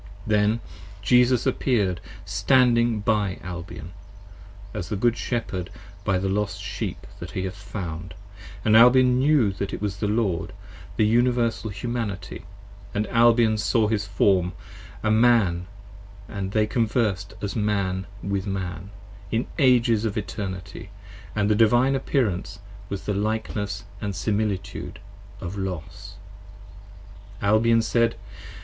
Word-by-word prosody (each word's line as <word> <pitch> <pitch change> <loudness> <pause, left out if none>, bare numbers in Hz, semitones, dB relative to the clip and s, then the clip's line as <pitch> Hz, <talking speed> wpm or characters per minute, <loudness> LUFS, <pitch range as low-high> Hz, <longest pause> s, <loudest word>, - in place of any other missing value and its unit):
Then 105 +1 +2 0.4
Jesus 125 +3 +4
appeared 100 -9 +1 0.2
standing 120 -4 +3
by 105 -3 +1
Albion, 85 -3 -7 0.8
as 100 -5 -5
the 105 - -1
Good 115 +3 +2
Shepherd 95 -8 -3 0.3
By 95 - +1
the 95 +1 -1
lost 105 +1 -1
Sheep - - -5
that - - -7
he 95 - -2
hath 95 -1 -3
found, 95 -4 -6 0.3
& - - -15
Albion 125 +3 +6
knew 135 -6 +4
that 95 +1 -4
it - - -2
5 - - -14
Was 100 -1 -2
the 105 - -1
Lord, 105 -5 0 0.4
the 110 - +4
Universal 115 -1 +2
Humanity, 100 -4 -4 0.3
& 100 - -18
Albion 115 +1 +3
saw 110 0 +2
his 105 -2 -1
Form 95 -3 +2 0.5
A 110 - +2
Man, 110 -7 +3 0.4
& 100 0 -19
they 100 +1 -1
conversed 110 -4 0
as 100 - -4
Man 100 -4 0 0.2
with 100 0 -2
Man, 95 -2 -4 0.4
in 115 +2 0
Ages 120 -5 +4
of 110 -1 -2
Eternity. 95 -3 -5 0.5
And 105 -1 +1
the 105 - +4
Divine 120 +5 +4
Appearance 110 -8 -1 0.3
was 100 -1 -4
the 105 - 0
likeness 105 -1 -2 0.2
& 105 -2 -2
similitude 100 +1 -2 0.4
of 95 +4 -5
Los. 90 -4 -6 1.3
Albion 115 +2 +4
said. 115 0 +2
105 Hz, 130 wpm, -24 LUFS, 95-115 Hz, 1.3 s, Albion